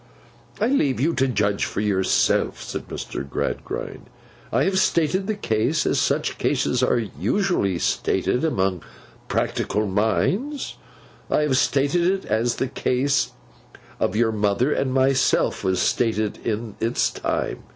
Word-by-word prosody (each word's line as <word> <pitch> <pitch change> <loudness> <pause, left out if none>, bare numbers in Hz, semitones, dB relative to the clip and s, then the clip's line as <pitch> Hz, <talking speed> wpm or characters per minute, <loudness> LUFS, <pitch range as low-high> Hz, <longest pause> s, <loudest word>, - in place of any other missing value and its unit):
'I 215 - +2
now 275 - +3
leave 135 - +1
you 160 +6 +2
to 135 -3 +2
judge 105 -4 0
for - - -3
yourself,' 100 -3 +1
said - - -6
Mr. 70 - -5
Gradgrind. - - -4 0.4
'I - - +2
have 190 0 +2
stated 180 +3 +1
the 215 - 0
case, 115 - 0
as - - +2
such - - 0
cases 125 - +1
are 125 - +3
usually 105 - 0
stated 125 - 0
among 95 - 0 0.5
practical 105 +1 -1
minds; 145 - 0 0.5
I - - +2
have 150 -3 +1
stated 140 +5 +2
it, 190 +1 0
as 115 +3 0
the 130 - -1
case 135 +3 0 0.7
of - - 0
your 115 0 +2
mother 105 +6 +1
and 130 - 0
myself 130 0 +2
was 95 -1 +1
stated 110 0 0
in 110 -1 -3
its 115 +2 +1
time. - - -2
125 Hz, 140 wpm, -23 LUFS, 105-150 Hz, 0.7 s, now